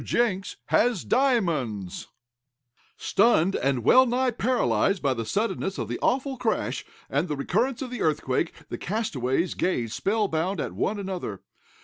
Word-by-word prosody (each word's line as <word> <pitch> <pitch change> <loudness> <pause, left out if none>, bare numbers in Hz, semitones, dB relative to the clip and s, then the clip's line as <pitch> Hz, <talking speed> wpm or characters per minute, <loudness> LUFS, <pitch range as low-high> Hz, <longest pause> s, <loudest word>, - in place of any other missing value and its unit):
JENKS 200 -5 0
HAS 240 0 +2
DIAMONDS 160 - 0 0.9
Stunned, 195 -4 +3
and 135 -3 0
well 255 - +6
nigh 250 +1 +1
paralyzed 200 - +1
by 140 -4 +1
the 115 -3 -4
suddenness 200 - -1
of - - -3
the - - -3
awful 265 +1 0
crash, 215 - -1 0.2
and 145 +6 0
the 150 - -2
recurrence 230 - 0
of 255 - -7
the 245 - -5
earthquake, 150 0 0 0.2
the - - -5
castaways 175 - -1
gazed 120 -11 -1
spell 210 +1 +1
bound 170 +2 -1
at - - -3
one 210 - -1
another. 185 - -5
190 Hz, 145 wpm, -26 LUFS, -, 0.9 s, well